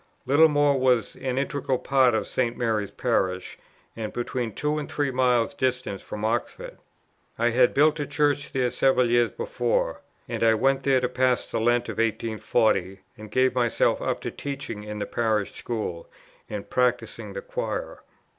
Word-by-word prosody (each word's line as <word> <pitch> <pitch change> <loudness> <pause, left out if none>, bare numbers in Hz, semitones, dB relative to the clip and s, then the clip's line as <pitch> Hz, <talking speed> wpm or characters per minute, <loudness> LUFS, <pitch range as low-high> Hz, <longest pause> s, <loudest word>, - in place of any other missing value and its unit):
Littlemore 145 -1 +4
was 125 -3 +2
an 130 -1 -3
integral 135 -1 -1
part 130 -3 +3
of - - 0
St. 120 -2 -1
Mary's 110 -4 0
Parish, 95 -1 -1 0.4
and 110 -2 -4
between 120 -1 -3
two 150 +7 -1
and 150 - -6
three 145 -2 0
miles 125 -2 +2
distant 125 -7 -2
from 105 +1 -5
Oxford. 110 - -3 0.6
I 120 +1 +2
had 125 +1 +3
built 150 +2 +4
a 145 - -2
Church 145 -1 0
there 125 -3 0
several 125 -3 +2
years 120 0 +4
before; - - -1 0.3
and - - -4
I 115 -1 +5
went 135 +4 +2
there 135 -2 +2
to 125 - +1
pass 125 0 0
the - - -1
Lent 120 +1 +2
of - - -5
1840, 110 -3 0
and 110 0 -11
gave 130 +1 +2
myself 120 -2 +1
up - - -2
to - - -4
teaching 135 -7 -6
in 105 0 -6
the 105 - -2
Parish 110 -2 -1
School, 105 -8 -5 0.4
and 105 -1 -5
practising 115 -3 -1
the 100 - -6
choir. - - -4
125 Hz, 165 wpm, -25 LUFS, 110-135 Hz, 0.6 s, I